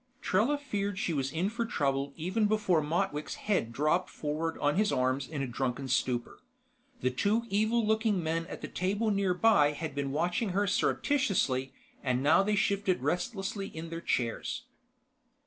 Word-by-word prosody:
Trella 235 Hz, +10 st, +2 dB
feared 205 Hz, -8 st, -3 dB
she 175 Hz, -, -1 dB
was 135 Hz, -2 st, -1 dB
in 175 Hz, +6 st, -1 dB
for 235 Hz, +1 st, -1 dB
trouble 140 Hz, -, -1 dB
even 190 Hz, +7 st, 0 dB
before 205 Hz, -6 st, +2 dB
Motwick's 155 Hz, 0 st, -1 dB
head 190 Hz, -, -1 dB
dropped 155 Hz, +8 st, +1 dB
forward 155 Hz, +2 st, -3 dB
on 145 Hz, 0 st, +1 dB
his 210 Hz, +2 st, +2 dB
arms 130 Hz, +1 st, +1 dB
in 145 Hz, -3 st, -3 dB
a -, -, -2 dB
drunken 130 Hz, +2 st, -2 dB
stupor. 125 Hz, -1 st, -1 dB, 0.6 s
The 130 Hz, -, +1 dB
two 205 Hz, -, +1 dB
evil 220 Hz, +3 st, +2 dB
looking 220 Hz, -4 st, +1 dB
men 165 Hz, +1 st, -1 dB
at -, -, -8 dB
the -, -, -4 dB
table 205 Hz, +4 st, 0 dB
nearby 195 Hz, -5 st, +3 dB
had 155 Hz, 0 st, -5 dB
been 140 Hz, -1 st, -2 dB
watching 175 Hz, -, 0 dB
her 205 Hz, -, +3 dB
surreptitiously, 195 Hz, -, +1 dB, 0.3 s
and 130 Hz, 0 st, 0 dB
now 155 Hz, +6 st, +5 dB
they 210 Hz, +2 st, +1 dB
shifted 200 Hz, -2 st, +1 dB
restlessly 195 Hz, +2 st, -2 dB
in 165 Hz, -1 st, -8 dB
their 165 Hz, 0 st, -4 dB
chairs. 120 Hz, -7 st, -1 dB
175 Hz, 165 wpm, -30 LUFS, 145-205 Hz, 0.6 s, now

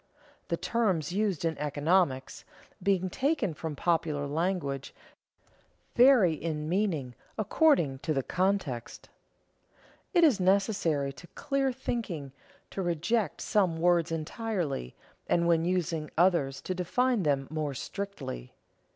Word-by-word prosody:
_ -, -, -41 dB
The -, -, -1 dB
terms 190 Hz, -, 0 dB
used 195 Hz, -4 st, 0 dB
in 165 Hz, -1 st, 0 dB
economics, 150 Hz, -1 st, 0 dB, 0.4 s
being 190 Hz, -1 st, +1 dB
taken 255 Hz, -, 0 dB
from 155 Hz, 0 st, -5 dB
popular 155 Hz, -2 st, 0 dB
language, 145 Hz, -3 st, -2 dB, 1.0 s
vary 245 Hz, -9 st, +6 dB
in 155 Hz, -1 st, -3 dB
meaning 165 Hz, -9 st, 0 dB, 0.2 s
according 215 Hz, -, +3 dB
to 155 Hz, -, -3 dB
the 135 Hz, -3 st, 0 dB
context. 180 Hz, -, -2 dB, 1.1 s
It 345 Hz, -, +6 dB
is 275 Hz, -11 st, +5 dB
necessary 185 Hz, -7 st, +1 dB
to 175 Hz, +6 st, -13 dB
clear 275 Hz, -1 st, 0 dB
thinking 180 Hz, -, -4 dB, 0.4 s
to 195 Hz, -, -3 dB
reject 175 Hz, +5 st, 0 dB
some 185 Hz, -6 st, +1 dB
words 170 Hz, -1 st, +2 dB
entirely 165 Hz, -, -3 dB, 0.3 s
and 170 Hz, 0 st, +2 dB
when 165 Hz, -1 st, +3 dB
using 170 Hz, -4 st, -1 dB
others 170 Hz, -6 st, +2 dB
to 185 Hz, -, -3 dB
define 230 Hz, +6 st, +1 dB
them 140 Hz, -4 st, +1 dB
more 155 Hz, -3 st, -2 dB
strictly. 195 Hz, -, -6 dB
170 Hz, 120 wpm, -29 LUFS, 150-200 Hz, 1.1 s, vary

